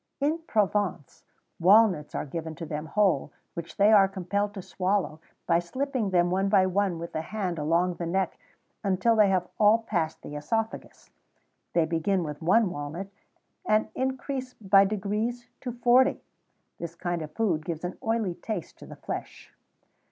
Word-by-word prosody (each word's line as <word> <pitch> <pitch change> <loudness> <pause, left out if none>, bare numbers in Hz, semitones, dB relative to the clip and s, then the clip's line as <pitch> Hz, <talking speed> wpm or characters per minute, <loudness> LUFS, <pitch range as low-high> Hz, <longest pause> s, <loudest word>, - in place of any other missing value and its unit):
In 300 +4 +1
Provence, 205 - 0 0.4
walnuts 185 -4 +4
are - - -2
given 160 +2 -5
to 165 - -6
them 150 0 -5
whole, 185 -7 +1 0.2
which 170 -1 -7
they 205 +2 +5
are 200 -3 +7
compelled 200 +2 -2
to 195 - -5
swallow 185 -4 -1 0.3
by 170 - +3
slipping 255 - -2
them 175 -1 +2
one 195 +2 +1
by 195 -2 +5
one 185 -1 0
with 170 +1 -7
the 155 - -1
hand 180 -1 -3
along 170 +4 +1
the 170 - -3
neck 190 +3 0 0.5
until 200 +4 +2
they 210 -2 +5
have 185 -2 +1
all 215 +1 +6
past 170 -8 -2
the - - -8
œsophagus; 220 +10 -4 0.6
they 170 -2 +3
begin 170 +3 0
with 150 -1 -6
one 190 +4 +3
walnut, 165 +5 -5 0.5
and 215 0 +2
increase 260 0 -3
by 195 -1 +5
degrees 215 +4 -2
to 250 - -4
forty. 245 +3 +3 0.6
This 170 -1 -6
kind 175 -1 -3
of 155 -1 -7
food 180 -9 0
gives 165 0 -5
an 180 +1 -3
oily 225 -5 0
taste 195 -1 -6
to - - -11
the - - -10
flesh. - - -7
190 Hz, 165 wpm, -27 LUFS, 170-215 Hz, 0.6 s, are